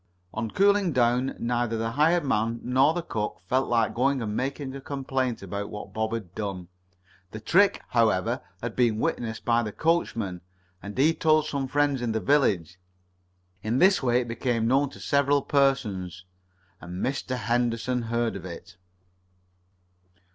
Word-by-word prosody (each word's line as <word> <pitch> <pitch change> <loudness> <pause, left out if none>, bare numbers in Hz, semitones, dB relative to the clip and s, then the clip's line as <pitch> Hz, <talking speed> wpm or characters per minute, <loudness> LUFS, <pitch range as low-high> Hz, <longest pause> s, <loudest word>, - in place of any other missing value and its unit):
On 110 0 -3
cooling 200 - +3
down 125 +1 +2
neither 120 -1 -1
the 115 +1 -2
hired 155 +5 +2
man 115 -2 0
nor 130 +4 +3
the 175 - -2
cook 105 -10 -3
felt 130 +5 +1
like 115 -2 +2
going 135 +4 +1
and 105 -3 -3
making 135 +1 -3
a 135 - -7
complaint 135 -5 -2
about 100 +2 -4
what 105 - -8
Bob 110 0 -1
had 105 -6 -5
done. 95 -4 -5 0.6
The 110 - -7
trick, 195 - +3
however, 110 -6 +2 0.2
had - - -4
been 120 -4 +2
witnessed 110 0 -2
by 120 0 +3
the 110 -2 -4
coachman, 115 - -1 0.4
and 100 +3 -8
he 150 +5 +4
told 155 -2 +3
some 140 -3 -2
friends 145 -1 +1
in 115 -2 -1
the 110 - 0
village. 90 - +1 0.8
In 110 +3 -1
this 190 +5 +5
way 125 -1 +2
it 120 - -6
became 115 -1 -1
known 135 +3 +3
to - - -13
several 140 0 +2
persons, 100 -11 0 0.6
and 90 +1 -4
Mr. 130 -1 -2
Henderson 120 +1 0
heard 115 0 -1
of 95 - -7
it. 85 0 -10
120 Hz, 160 wpm, -26 LUFS, 110-140 Hz, 0.8 s, this